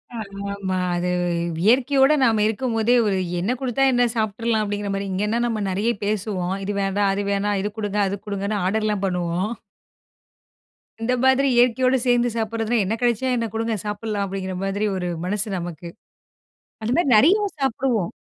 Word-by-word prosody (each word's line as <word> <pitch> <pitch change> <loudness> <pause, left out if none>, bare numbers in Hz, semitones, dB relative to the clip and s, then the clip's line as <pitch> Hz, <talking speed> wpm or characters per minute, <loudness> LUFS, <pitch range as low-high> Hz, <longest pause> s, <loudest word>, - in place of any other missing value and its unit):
ஆமாமா. 200 -2 -4 0.2
அது 180 +1 -1 0.5
இயற்கையோட 265 +5 +4
நாம 220 -3 +3
இருக்கும்போதே, 230 +1 +1
"ஒரு 195 - +1 0.2
என்ன 190 +7 0
குடுத்தா 265 +1 0
என்ன? 245 - +3
சாப்ட்டுறலாம்." 220 0 0
அப்படீங்கிற 205 -1 -3
மாரி. 195 0 -3
இங்கேன்னா, 210 +5 0
நம்ம 220 -3 -2
நெறைய 205 +5 0
பேசுவோம். 195 -3 -1
இது 205 - -2
வேண்டாம், 195 +1 +1
அது 200 +1 -2
வேணாம், 200 0 0
இது 210 - -2
குடுங்க, 205 -1 -2
அது 200 - -3
குடுங்கன்னு 200 0 -2
ஆர்டர்லாம் 210 0 0
பண்ணுவோம். 180 +1 -1 1.5
இந்த 240 +3 0
மாதிரி 265 +1 +4
இயற்கையோடு 255 +2 +3
சேர்ந்து 245 0 +3
சாப்புடுறதுனா, 225 +1 -1
"என்ன 210 - -1
கெடைச்சா 240 +1 +1
என்ன? 230 -1 -1
குடுங்க 225 0 -1
சாப்புடலாம்." 210 0 -2
அப்படீங்கிற 190 -1 -4
மாதிரி 200 +2 -1
ஒரு 180 -1 -2 0.2
மனசு 205 +3 -2
நமக்கு. 170 -1 -6 0.9
அந்த 220 - -2
மாரி 345 -5 +2
நெறைய 330 - +6 0.2
சாப்புடுவோம். 250 -7 0
210 Hz, 150 wpm, -22 LUFS, 195-235 Hz, 1.5 s, நெறைய